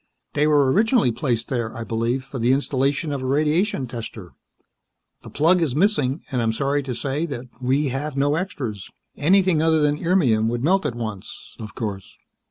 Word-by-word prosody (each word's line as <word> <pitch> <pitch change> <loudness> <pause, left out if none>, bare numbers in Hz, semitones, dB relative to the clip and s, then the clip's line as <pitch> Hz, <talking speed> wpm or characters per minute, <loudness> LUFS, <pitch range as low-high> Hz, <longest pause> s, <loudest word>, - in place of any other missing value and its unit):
They 150 +1 +2
were 145 -3 +4
originally 220 - +3
placed 120 -1 -1
there, 120 -4 -2
I 115 - -4
believe, 115 +4 -1
for 135 -1 -7
the 120 +3 +3
installation 140 +2 0
of 140 -2 -3
a - - -4
radiation 150 - +1
tester. 115 -6 -8 0.9
The - - -11
plug 170 +4 +3
is 145 -6 0
missing, 155 -6 +1
and 125 -2 0
I - - 0
am 110 0 +1
sorry 140 +4 0
to 130 -3 -5
say 140 +7 -2
that 130 -4 -6 0.2
we 135 +3 +1
have 140 +2 -3
no 145 +1 +2
extras. 135 - -4 0.3
Anything 180 +1 +3
other 160 0 +3
than 150 0 +1
irmium 130 - +3
would 120 +1 -2
melt 185 +1 +2
at 120 - -4
once, 110 -5 -7
of 110 -1 -8
course." 100 -5 -5
135 Hz, 185 wpm, -22 LUFS, 120-155 Hz, 0.9 s, were